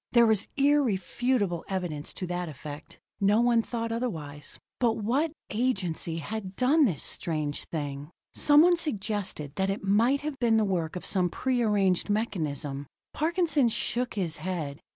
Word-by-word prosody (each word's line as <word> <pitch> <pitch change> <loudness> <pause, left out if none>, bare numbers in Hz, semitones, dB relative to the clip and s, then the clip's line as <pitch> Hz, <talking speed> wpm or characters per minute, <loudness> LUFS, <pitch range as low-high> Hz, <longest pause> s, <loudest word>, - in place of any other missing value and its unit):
There 235 -1 +7
was 220 -3 +2
irrefutable 245 - +1
evidence 175 -6 -3
to 185 - -3
that 175 -1 -3
effect; 150 +1 -9 0.2
no 205 +2 +4
one 240 -1 +4
thought 230 0 -4
otherwise. 155 -12 -4 0.2
But 235 -3 +3
what 255 +10 0 0.2
agency 190 -8 -1
had 195 +3 -5
done 280 +6 +4
this 175 - 0
strange 150 -3 -2
thing? 145 -2 -4 0.2
Someone 320 +4 +6
suggested 205 - -2
that 190 0 +1
it 195 +1 -2
might 230 +8 +3
have 295 -2 -4
been 230 -2 +3
the 215 - +3
work 175 -5 -1
of 180 - -5
some 180 -3 +2
prearranged 210 -5 +1
mechanism. 150 -10 -2 0.3
Parkinson 320 -5 +2
shook 245 +2 -2
his 175 -5 -1
head. 155 -4 -4
205 Hz, 145 wpm, -28 LUFS, 165-245 Hz, 0.3 s, There